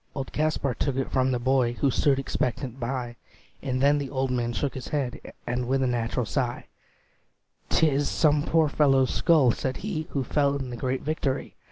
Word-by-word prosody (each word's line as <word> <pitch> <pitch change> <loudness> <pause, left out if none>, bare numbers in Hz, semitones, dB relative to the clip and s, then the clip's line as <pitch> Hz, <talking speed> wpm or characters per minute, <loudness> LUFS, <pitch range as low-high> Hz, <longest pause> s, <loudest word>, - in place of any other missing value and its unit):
Old 135 -3 -5
Kaspar 150 -3 0
took 135 +3 -1
it 135 0 -2
from 130 0 +2
the 125 - +1
boy, 125 -1 +2
Who 135 +2 +1
stood 140 +2 +2
expectant 130 -1 -2
by; 120 -1 -3 0.4
And 130 -2 -2
then 145 +1 +4
the 140 -2 -4
old 130 -1 -1
man 120 -1 0
shook 140 +3 -2
his 130 - -7
head, 140 -5 -2 0.2
And 125 +1 -2
with 135 +1 +1
a - - +2
natural 120 0 -1
sigh, 120 +2 -2 1.0
"'T 160 - +4
is 145 -1 +1
some 150 -2 +3
poor 160 +1 +2
fellow's 135 -3 +3
skull," 155 -8 +4
said 130 +1 -3
he, 160 -7 -3
"Who 140 - -1
fell 140 +2 +1
in 130 -3 -4
the - - -4
great 130 +2 -2
victory. 145 -3 -2
135 Hz, 195 wpm, -26 LUFS, 125-145 Hz, 1.0 s, then